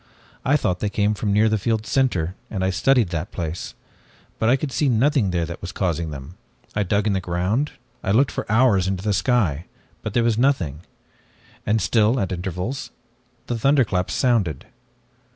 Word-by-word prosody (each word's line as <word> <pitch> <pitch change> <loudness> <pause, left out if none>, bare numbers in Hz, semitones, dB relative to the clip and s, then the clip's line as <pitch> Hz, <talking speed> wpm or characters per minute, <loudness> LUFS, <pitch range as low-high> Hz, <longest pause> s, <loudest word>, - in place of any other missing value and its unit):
I 145 +3 +3
thought 90 -10 -1
they 105 - -1
came 105 +1 +1
from 105 0 -2
near 105 +2 +4
the 110 -1 +1
field's 110 +1 -1
center, 95 -11 +1 0.2
and 95 -3 -3
I 95 - +1
studied 120 +2 +3
that 85 +2 -4
place. 85 -1 -5 0.6
But 110 - +2
I 130 - +6
could 135 +1 -3
see 145 +1 +1
nothing 125 -2 +2
there 85 -2 0
that 85 +1 -8
was 90 - -5
causing 85 -3 -1
them. 70 +5 -9 0.4
I 105 - +1
dug 100 +1 +1
in 105 - +2
the 95 - 0
ground, 90 +11 -1 0.3
I - - -2
looked 130 +7 +3
up - - -12
for - - -4
hours 110 -5 +4
into 95 -1 -2
the 105 -1 +1
sky, 95 - +1 0.4
but 110 - -5
there 120 - +3
was 115 -1 +1
nothing. 90 - +1 0.9
And 110 +1 +3
still, 110 +3 +2
at 95 - -1
intervals, 95 +8 -4 0.6
the 120 -1 -3
thunderclaps 115 -9 +2
sounded. 105 - +1
105 Hz, 190 wpm, -22 LUFS, 90-120 Hz, 0.9 s, I